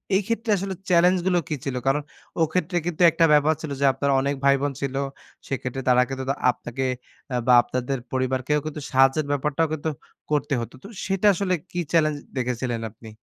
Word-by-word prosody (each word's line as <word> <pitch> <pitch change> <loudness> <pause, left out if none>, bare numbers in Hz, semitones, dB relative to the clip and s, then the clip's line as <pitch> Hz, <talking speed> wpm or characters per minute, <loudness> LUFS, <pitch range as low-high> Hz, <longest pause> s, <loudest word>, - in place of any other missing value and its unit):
এই 195 - +4
ক্ষেত্রে 230 0 -2
আসলে 195 +1 -3 0.2
চেলেঞ্জ 180 +1 +5
গুলো 180 -2 +3
কী 155 - 0
ছিল? 135 -2 -2
কারণ 140 +2 +2 0.4
ও - - +2
ক্ষেত্রে 180 +1 0
কিন্তু 175 -1 -3
একটা 165 +1 +3
ব্যাপার 150 +1 +4
ছিল 155 -3 -5
যে 140 - +2
আপনার 140 +1 0
অনেক 140 +1 0
ভাই 140 0 +6
বোন 145 0 0
ছিল। 135 -1 -2 0.5
সেক্ষেত্রে 135 0 -3
তারা 125 0 +5
কিন্তু 135 0 -4 0.3
আপনাকে 120 +2 -6 0.5
আ - - 0
বা 125 - +6
আপনাদের 130 +2 -3 0.2
পরিবারকেও 130 +3 0
কিন্তু 155 -1 -5
সাহায্যের 135 +3 +3
ব্যাপারটাও 150 +3 0
কিন্তু 155 0 -2 0.4
করতে 145 0 +1
হতো 115 - -7
তো, - - -9 0.2
সেটা 195 +1 +1
আসলে 185 0 -1 0.2
কী 175 - -3
চ্যালেঞ্জ 155 -3 +3 0.2
দেখেছিলেন 125 -1 -2
আপনি? 110 +1 -13
145 Hz, 185 wpm, -24 LUFS, 130-165 Hz, 0.5 s, ভাই